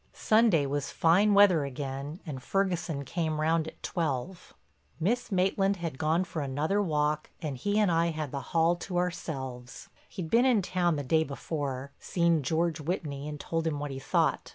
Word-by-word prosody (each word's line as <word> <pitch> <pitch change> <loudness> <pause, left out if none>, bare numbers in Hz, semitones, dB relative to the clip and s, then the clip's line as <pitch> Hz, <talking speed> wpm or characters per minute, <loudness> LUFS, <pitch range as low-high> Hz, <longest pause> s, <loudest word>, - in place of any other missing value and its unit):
Sunday 215 -9 +3
was 140 0 -2
fine 195 +5 +4
weather 195 -6 +6
again 140 +4 -5
and 140 -5 -6
Ferguson 175 -5 -1
came 155 +2 -2
round 160 +1 +1
at - - -11
twelve. 165 +2 -3 0.5
Miss 235 +8 0
Maitland 195 +1 +2
had 165 -7 -5
gone 160 +3 +2
for 165 -3 -5
another 150 +9 0
walk 150 -4 0
and 150 -5 -4
he 205 +11 -1
and 210 -4 +3
I 165 0 +3
had 155 -4 -3
the 140 - -3
hall 165 +1 +3
to 175 +1 -4
ourselves. 130 -8 -4 0.2
He'd 175 -5 -6
been 235 +2 +5
in 235 -7 +3
town 175 -2 +1
the 145 - -3
day 160 +4 +2
before, 140 -2 -4
seen 170 -3 +1
George 160 +3 0
Whitney 150 -3 -3
and 150 -1 -6
told 165 +2 -2
him 155 -2 -1
what 145 0 -4
he 135 - -5
thought. - - 0
160 Hz, 175 wpm, -29 LUFS, 145-180 Hz, 0.5 s, weather